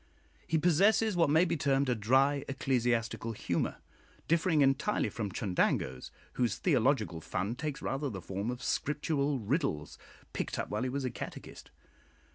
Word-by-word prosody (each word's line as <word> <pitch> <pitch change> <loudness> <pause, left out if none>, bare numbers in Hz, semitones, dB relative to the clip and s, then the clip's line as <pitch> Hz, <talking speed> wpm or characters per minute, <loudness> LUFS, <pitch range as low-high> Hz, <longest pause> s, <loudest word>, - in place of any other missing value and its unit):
He 160 - +2
possesses 195 +6 +3
what 165 -4 +3
may 160 +4 +5
be - - 0
termed 140 -2 +1
a 125 - +2
dry 135 +6 +2
ecclesiastical 120 -4 0
humour, 90 -5 -1 0.5
differing 165 -1 +3
entirely 135 - +2
from 105 -2 -4
Chundango's, 75 -10 -1 0.2
whose 120 -2 0
theological 125 - +1
fun 100 +7 -2
takes 145 +2 -5
rather 140 +1 -2
the 100 -6 -6
form 100 +5 -4
of 125 +1 -5
Scriptural 145 -1 0
riddles, 110 - -2 0.3
picked - - -3
up - - -3
while - - -1
he 130 - -1
was 135 +1 -2
a 125 - -1
catechist. - - -8
135 Hz, 150 wpm, -31 LUFS, 115-150 Hz, 0.5 s, may